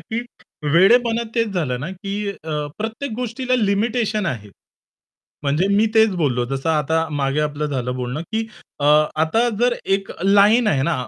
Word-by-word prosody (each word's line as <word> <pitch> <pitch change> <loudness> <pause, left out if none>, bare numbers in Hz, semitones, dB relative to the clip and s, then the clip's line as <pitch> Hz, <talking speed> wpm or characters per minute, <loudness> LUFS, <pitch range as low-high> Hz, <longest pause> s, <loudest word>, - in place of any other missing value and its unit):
की 235 +1 -4 0.5
वेडेपणा 230 +6 +4
तेच 230 -2 +1
झालं 140 -9 -2
ना 150 +7 -5
की 200 +2 -4 0.5
प्रत्येक 225 +6 -4
अ, 220 - -5
गोष्टीला 250 +1 -2
लिमिटेशन 215 0 0
आहे. 115 - -4 1.0
म्हणजे 150 +7 +1
मी 200 +2 +3
तेच 220 -1 +5
बोललो 135 -8 0
जसं 135 +3 -2
आता 160 +1 +1
मागे 140 0 -1
आपलं 150 0 -1
झालं 125 -3 -3
बोलणं, 125 +4 -4
की 220 0 -1 0.3
अ, 145 - -1 0.3
आता 160 +10 +2
जर 245 0 +2
एक 195 0 -1
लाईन 205 +4 +5
आहे 135 -10 +2
ना 170 +3 +1
195 Hz, 155 wpm, -20 LUFS, 150-225 Hz, 1.0 s, तेच